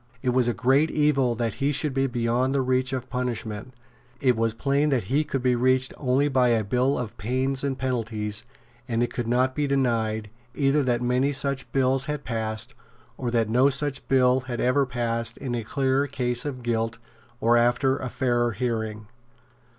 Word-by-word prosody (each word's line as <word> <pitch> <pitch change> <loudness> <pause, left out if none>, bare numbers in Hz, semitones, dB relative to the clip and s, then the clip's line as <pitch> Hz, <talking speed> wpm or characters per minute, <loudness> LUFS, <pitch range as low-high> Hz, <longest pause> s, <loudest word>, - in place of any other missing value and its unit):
It 130 - +1
was 125 -1 +2
a 120 - +1
great 135 +6 +3
evil 140 -5 +2
that 115 -1 -1
he 140 +1 0
should 150 0 0
be 135 0 +1
beyond 120 +2 0
the 135 - +2
reach 130 0 +1
of 130 -2 -3
punishment; 120 -2 -4 0.5
it 125 -2 +3
was 115 0 0
plain 140 +4 +1
that 130 -6 +1
he 150 +2 +3
could 135 -4 -3
be 125 -1 +3
reached 130 +1 +2
only 135 +1 +1
by 130 -3 +3
a 115 -2 +2
bill 125 +6 +1
of 115 -2 -5
pains 130 +6 0
and 135 -2 -1
penalties; 110 -4 -2 0.4
and 115 -1 0
it 120 - -3
could 120 -2 -3
not 125 +2 +2
be 145 0 -1
denied, 115 -6 0 0.2
either 140 +1 +2
that 125 -2 0
many 125 +3 +2
such 140 -1 -3
bills 135 0 +2
had 150 -2 -4
passed, 110 -2 -2 0.4
or 125 - -3
that 115 -2 +1
no 125 +5 +4
such 140 0 -1
bill 130 -1 +4
had 125 -2 -5
ever 135 +2 +2
passed 115 -2 -2
in 130 -3 -4
a 120 -1 -2
clearer 135 +4 0
case 125 -2 -1
of 130 -4 -5
guilt 115 -1 -1 0.4
or 115 +1 +3
after 120 +3 +3
a 130 - -4
fairer 120 -1 0
hearing. 110 -2 -3
125 Hz, 190 wpm, -25 LUFS, 120-135 Hz, 0.5 s, no